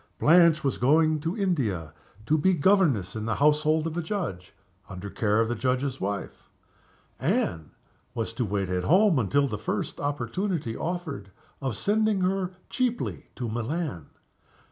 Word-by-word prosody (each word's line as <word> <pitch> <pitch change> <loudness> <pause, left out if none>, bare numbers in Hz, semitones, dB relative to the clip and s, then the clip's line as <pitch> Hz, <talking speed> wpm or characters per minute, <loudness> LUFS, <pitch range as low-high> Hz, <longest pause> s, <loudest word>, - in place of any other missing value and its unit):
Blanche 165 -1 +5
was 135 - -1
going 155 +4 +3
to 165 +7 -3
India, 115 - -1 0.3
to 150 - +2
be 185 +4 +3
governess 145 - +2
in 110 0 -4
the 115 - 0
household 150 +2 +3
of 165 -1 -3
a 175 - -1
Judge, 160 - -4 0.4
under 95 +1 -7
care 105 -1 +1
of 115 - +2
the 120 - -1
Judge's 130 +3 -1
wife. 100 0 -4 0.7
Anne 80 -2 0 0.5
was 115 -1 -2
to 125 - -1
wait 100 -3 -2
at 90 -1 -1
home 185 -3 +4
until 140 +6 +2
the 105 -5 -4
first - - -3
opportunity 145 - -2
offered 160 - -4 0.3
of 130 -6 -2
sending 215 -1 +1
her 185 0 0 0.2
cheaply 250 -2 -2
to 125 - -4
Milan. 120 - -3
145 Hz, 150 wpm, -27 LUFS, 110-175 Hz, 0.7 s, Blanche